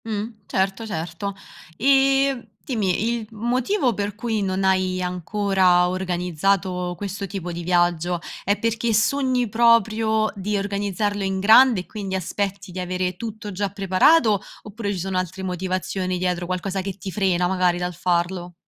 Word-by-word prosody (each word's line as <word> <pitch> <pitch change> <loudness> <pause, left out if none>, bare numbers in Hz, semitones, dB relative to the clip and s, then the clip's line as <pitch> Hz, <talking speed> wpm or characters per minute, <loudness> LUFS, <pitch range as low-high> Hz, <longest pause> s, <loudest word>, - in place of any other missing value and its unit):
Mh. 220 +1 -3
Certo, 195 +3 -1
certo. 175 +2 -4 0.4
E 270 -1 +3 0.2
dimmi, 220 -2 0
il 220 - -9
motivo 245 - 0
per 205 -1 -3
cui 220 -1 -2
non 190 0 -1
hai 185 -1 +2
ancora 180 0 +2
organizzato 180 0 -1
questo 200 0 -4
tipo 180 -2 -5
di 170 0 -5
viaggio, 175 0 +1 0.2
è 205 +2 +1
perché 230 0 0
sogni 255 +2 +2
proprio 220 -1 +3
di 205 +1 -2
organizzarlo 205 0 -1
in 190 0 -1
grande, 220 +1 +6
e - - -13
quindi 195 -3 -5
aspetti 195 +1 -3
di 185 - -6
avere 180 0 -2
tutto 215 +1 -6
già 200 +1 -2
preparato; 200 - +3 0.2
oppure 210 0 -4
ci 190 - -3
sono 190 +1 -2
altre 185 +1 -5
motivazioni 185 0 -2
dietro, 180 -1 -1
qualcosa 185 +1 -2
che 195 0 -5
ti 190 0 -6
frena 185 -3 +1
magari 180 -1 +2
dal 180 0 -3
farlo? 175 +1 -1
195 Hz, 150 wpm, -23 LUFS, 180-215 Hz, 0.4 s, grande